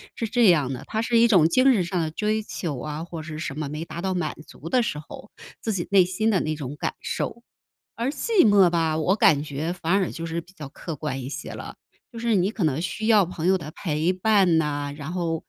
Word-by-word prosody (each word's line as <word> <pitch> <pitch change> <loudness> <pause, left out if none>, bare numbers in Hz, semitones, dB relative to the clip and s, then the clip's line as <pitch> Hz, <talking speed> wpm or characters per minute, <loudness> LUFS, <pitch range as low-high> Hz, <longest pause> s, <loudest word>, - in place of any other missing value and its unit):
是 230 - -2
这 235 +2 +3
样 150 -7 +3
的， 125 - -7
它 220 - -2
是 230 0 +1
一 230 +1 +6
种 180 -8 +6
精 255 +8 +5
神 200 -6 +2
上 180 +1 -2
的 160 -1 -2
追 215 +5 -1
求 165 -8 -4
啊， 150 +4 -5
或 165 -2 -7
是 155 0 -7
什 155 -3 -5
么 155 -2 -3
没 155 +3 -5
达 170 - -7
到 190 0 -1
满 180 -1 -2
足 155 - -11
的 250 +3 +3
时 150 -10 -3
候， 155 +7 -11 0.3
自 225 - -2
己 175 -3 -3
内 195 -1 +6
心 190 +5 0
的 200 -4 +2
那 155 0 -2
种 140 -1 -6
感 - - -2
受。 235 - -3 0.6
而 235 +3 -1
寂 400 +8 +1
寞 200 -3 +6
吧， 165 -2 +1
我 170 +4 +2
感 150 -8 +4
觉 155 +3 -3
反 175 -1 -2
而 195 -2 +1
就 165 - -6
是 165 +1 -3
比 180 - -20
较 150 -7 -9
客 160 +3 -7
观 135 -2 -4
一 125 - -6
些 145 +2 -6
了。 - - -8 0.4
就 230 - -8
是 230 -1 +1
你 190 0 +2
可 215 -4 -3
能 155 0 0
需 215 +4 -3
要 215 -3 +5
朋 170 -1 -4
友 190 +1 +4
的 155 -4 -7
陪 160 0 -1
伴 185 -3 +3
呐， 145 -2 -1
然 150 +3 -6
后， 170 -3 -2
175 Hz, 265 characters per minute, -24 LUFS, 155-205 Hz, 0.6 s, 一